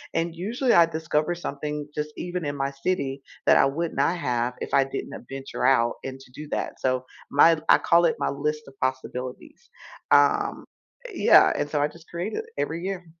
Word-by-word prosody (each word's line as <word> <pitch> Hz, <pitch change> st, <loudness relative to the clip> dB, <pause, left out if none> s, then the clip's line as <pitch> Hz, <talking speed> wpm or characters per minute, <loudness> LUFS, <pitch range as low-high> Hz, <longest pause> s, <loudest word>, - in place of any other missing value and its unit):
and 165 Hz, 0 st, -1 dB
usually 230 Hz, +8 st, 0 dB
I 170 Hz, -, +7 dB
discover 160 Hz, 0 st, -1 dB
something, 150 Hz, -2 st, -5 dB
just 150 Hz, 0 st, -2 dB
even 175 Hz, -1 st, -4 dB
in 145 Hz, 0 st, -2 dB
my 135 Hz, 0 st, -2 dB
city, 140 Hz, -2 st, -2 dB, 0.2 s
that -, -, +6 dB
I -, -, +5 dB
would 160 Hz, +5 st, -2 dB
not 145 Hz, +6 st, +1 dB
have 125 Hz, -5 st, -1 dB
if -, -, -6 dB
I 140 Hz, -, +5 dB
didn't 135 Hz, 0 st, -6 dB
adventure 135 Hz, -1 st, -5 dB
out 120 Hz, -3 st, +3 dB
and 135 Hz, 0 st, -6 dB
to 135 Hz, -, -17 dB
do 150 Hz, +4 st, -9 dB
that. -, -, -3 dB
So 130 Hz, -1 st, 0 dB, 0.3 s
my 160 Hz, +3 st, +6 dB
I -, -, +8 dB
call 170 Hz, +1 st, +4 dB
it 165 Hz, -, +2 dB
my -, -, 0 dB
list 150 Hz, +2 st, -2 dB
of 135 Hz, -, -13 dB
possibilities. 130 Hz, -1 st, -4 dB, 0.4 s
Um 145 Hz, 0 st, +3 dB, 0.5 s
Yeah, -, -, +6 dB
and 145 Hz, -, -2 dB
so 150 Hz, -1 st, 0 dB
I 145 Hz, -, +3 dB
just 165 Hz, +2 st, -17 dB
create 175 Hz, +5 st, -4 dB
it, 445 Hz, -, -3 dB
every 165 Hz, +2 st, -2 dB
year. 190 Hz, -1 st, -4 dB
150 Hz, 195 wpm, -25 LUFS, 135-170 Hz, 0.5 s, I